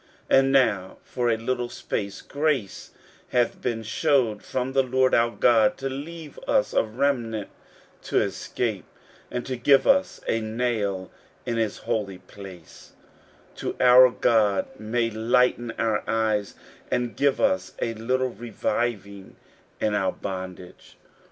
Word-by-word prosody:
15:009:008 - - +7
And 135 0 +2
now 110 -9 +2
for 120 -2 -1
a 115 - +2
little 120 +1 -2
space 100 -4 -4
grace 140 -8 -2 0.4
hath 120 -1 0
been 115 -2 -2
shewed 120 -2 +1
from 130 +1 -3
the 135 - +4
LORD 130 0 +1
our 115 0 +4
God, 115 -2 +3
to 135 0 -3
leave 150 +3 -8
us 105 - +2
a - - +3
remnant 115 -3 -1 0.6
to - - +2
escape, - - -2 0.4
and 125 0 -4
to 130 - -3
give 135 +3 +4
us 280 +1 +2
a 115 - +1
nail 110 -5 -2 0.3
in 120 -2 -2
his 110 -3 -1
holy 100 -4 -3
place, 90 -7 -13 0.7
that - - -4
our 125 0 +8
God 110 -5 +2
may 115 +2 -1
lighten 120 +2 +2
our 110 -2 0
eyes, 110 -2 0 0.3
and 125 -1 -1
give 140 -1 +2
us 95 0 +1
a 115 - -1
little 130 +4 -1
reviving 105 -4 -3 0.4
in 105 - 0
our 95 -2 0
bondage. 95 -2 -8
115 Hz, 140 wpm, -25 LUFS, 105-130 Hz, 0.7 s, our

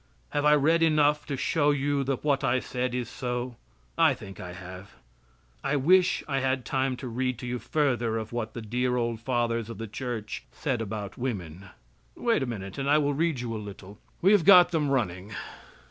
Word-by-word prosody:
Have 145 0 0
I 150 0 +7
read 160 +4 +3
enough 150 -2 +3
to 140 - -3
show 145 +2 +2 0.3
that 135 -1 -2
what 140 -2 +1
I 130 -1 +2
said 125 0 -3
is 125 -2 -2
so? 125 0 -4 0.4
I - - +5
think 95 -2 -11
I 90 0 -7
have. 95 +2 -10 0.7
I 150 - 0
wish 180 +6 +4
I 135 -2 0
had 130 -2 0
time 130 -1 0
to 130 - -6
read 125 +1 -1
to 125 - -7
you 125 0 -3
further 120 -4 0
of 110 0 -5
what 115 -2 -3
the 115 - -5
dear 125 +3 0
old 115 -2 -1
fathers 115 -2 -1
of 115 - -7
the 115 - -5
church 115 -1 -5
said 130 -6 -2
about 105 -1 -5
woman 95 -7 -4 0.5
wait 230 -7 +1
a 135 - -1
minute, 100 -4 -6
and 135 +1 -1
I 150 - +6
will 145 -1 +1
read 155 -3 0
you 120 -2 -4
a 110 - -4
little. 100 0 -10 0.2
We 190 - +6
have 205 -5 +5
got 180 -1 +8
them 155 -4 +1
running. 100 -6 -1
125 Hz, 200 wpm, -27 LUFS, 110-145 Hz, 0.7 s, got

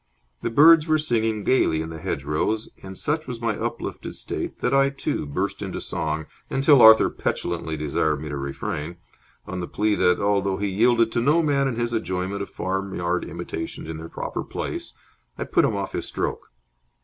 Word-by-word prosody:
The - - -1
birds 155 +6 +7
were 155 0 +4
singing 115 -7 0
gaily 90 -11 +3
in 80 +1 -4
the 80 - -7
hedgerows, 75 +11 -1
and 95 0 -9
such 155 +1 -1
was 120 -2 -5
my 115 -2 -1
uplifted - - -5
state - - -5
that 125 - +1
I, 135 0 +4
too, 140 - -3
burst 70 - -2
into - - -4
song, 80 0 -2 0.2
until 140 -1 +5
Arthur 110 0 +9
petulantly 80 -2 -3
desired 75 0 0
me 75 - -6
to 75 - -4
refrain, 70 +4 -4 0.5
on 95 - -5
the 90 - -4
plea 105 0 +1
that, 90 -3 +3
though 100 -1 +1
he 100 0 -1
yielded 115 +3 +3
to 120 - 0
no 150 +7 +3
man 140 -2 +2
in 130 - -2
his 120 0 -2
enjoyment 95 -1 -2
of 100 - -5
farmyard 95 -2 -2
imitations 80 -1 -6
in 80 -1 -5
their 80 +1 -8
proper - - -4
place, - - -5 0.4
I - - -2
put - - +2
him - - 0
off - - -3
his - - -3
stroke. - - -4
100 Hz, 185 wpm, -24 LUFS, 80-120 Hz, 0.5 s, Arthur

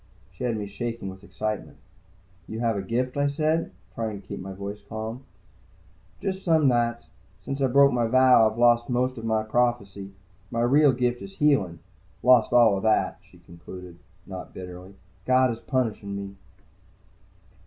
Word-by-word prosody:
She - - -6
had 115 -2 0
me 105 - -4
shaking 115 +1 -5
with 95 +1 -14
excitement. 110 +1 -4 0.7
"You 110 - -6
have 115 -2 +1
a 100 - -2
gift?" 125 +7 -2
I 145 0 +2
said, 155 +3 0 0.2
trying 110 -3 -4
to 95 - -19
keep - - -6
my 95 +1 -7
voice 100 +2 -6
calm. 110 +4 -6 0.9
"Just 190 -1 -3
some 160 -4 +3
nights. 120 -1 +1 0.4
Since 135 0 -4
I 135 - +4
broke 140 +2 +5
my 120 -2 +1
vow, 125 -2 +6
I've 110 - -10
lost 120 0 +4
most 125 0 0
of 115 - -7
my 110 -1 +1
prophecy. 110 -4 -1 0.4
My 115 -1 -2
real 140 +4 +5
gift 125 -1 -1
is 195 0 -10
healing. 105 - +2 0.4
Lost 125 -2 +5
all 120 -4 +6
of - - -4
that," 110 +1 +1
she - - -19
concluded, 85 +1 -11 0.3
not 95 -2 -9
bitterly. 90 +1 -9 0.3
"God 130 0 +4
is 115 - -6
punishing 110 -7 -2
me." 100 0 -6
115 Hz, 165 wpm, -25 LUFS, 100-130 Hz, 0.9 s, vow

